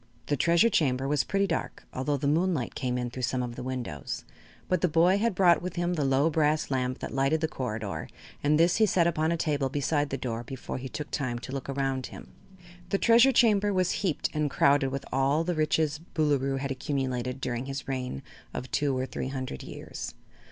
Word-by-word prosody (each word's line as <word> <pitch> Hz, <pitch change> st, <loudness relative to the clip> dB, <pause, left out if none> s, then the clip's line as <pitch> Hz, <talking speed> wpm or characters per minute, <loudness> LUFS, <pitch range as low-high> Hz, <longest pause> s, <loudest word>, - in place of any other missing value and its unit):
The 145 Hz, -, 0 dB
Treasure 170 Hz, -, +4 dB
Chamber 135 Hz, -3 st, +1 dB
was 145 Hz, -1 st, +2 dB
pretty 195 Hz, 0 st, +1 dB
dark, 170 Hz, -5 st, -3 dB
although 140 Hz, +3 st, -1 dB
the 140 Hz, -, -4 dB
moonlight 160 Hz, -3 st, +1 dB
came 125 Hz, -1 st, -2 dB
in 125 Hz, -1 st, -3 dB
through 130 Hz, -, -6 dB
some 125 Hz, +1 st, 0 dB
of 120 Hz, -1 st, -5 dB
the -, -, -6 dB
windows, 125 Hz, -, -4 dB, 0.4 s
but 185 Hz, -2 st, +1 dB
the 180 Hz, -, +4 dB
boy 175 Hz, +4 st, +4 dB
had 230 Hz, -2 st, +1 dB
brought 175 Hz, -3 st, +5 dB
with 180 Hz, +1 st, -5 dB
him 175 Hz, 0 st, 0 dB
the 155 Hz, -4 st, 0 dB
low 135 Hz, +4 st, +3 dB
brass 155 Hz, -1 st, +1 dB
lamp 130 Hz, -1 st, 0 dB
that -, -, -6 dB
lighted 135 Hz, +4 st, +2 dB
the 160 Hz, -, 0 dB
corrider 110 Hz, -8 st, -4 dB, 0.3 s
and 150 Hz, +1 st, +3 dB
this 170 Hz, +1 st, +4 dB
he 220 Hz, -1 st, +5 dB
set 175 Hz, -3 st, +3 dB
upon 160 Hz, -1 st, +1 dB
a 170 Hz, -, +1 dB
table 145 Hz, -4 st, 0 dB
beside 145 Hz, +1 st, 0 dB
the 135 Hz, -, -2 dB
door 115 Hz, -3 st, -3 dB
before 130 Hz, +1 st, -6 dB
he 130 Hz, +1 st, -6 dB
took 150 Hz, +3 st, -6 dB
time 125 Hz, -4 st, -1 dB
to 120 Hz, +2 st, -8 dB
look 135 Hz, 0 st, -5 dB
around 135 Hz, -2 st, -1 dB
him. -, -, -11 dB, 0.6 s
The 195 Hz, -, +2 dB
Treasure 235 Hz, +5 st, +6 dB
Chamber 210 Hz, -4 st, +4 dB
was 185 Hz, -2 st, +1 dB
heaped 185 Hz, -7 st, 0 dB
and 150 Hz, -1 st, 0 dB
crowded 140 Hz, 0 st, +3 dB
with 135 Hz, +1 st, -4 dB
all 135 Hz, +4 st, +2 dB
the 175 Hz, +1 st, -1 dB
riches 155 Hz, -2 st, +1 dB
the 165 Hz, 0 st, -12 dB
Boolooroo 140 Hz, -3 st, +2 dB
had 135 Hz, 0 st, -3 dB
accumulated 130 Hz, -2 st, -2 dB
during 125 Hz, 0 st, -3 dB
his 135 Hz, +1 st, -5 dB
reign 125 Hz, -, -3 dB, 0.3 s
of 130 Hz, -, -5 dB
two 140 Hz, -3 st, +1 dB
or 130 Hz, -, -1 dB
three 130 Hz, -, -4 dB
hundred 130 Hz, -, -5 dB
years. -, -, -7 dB
140 Hz, 215 wpm, -28 LUFS, 130-165 Hz, 0.6 s, Treasure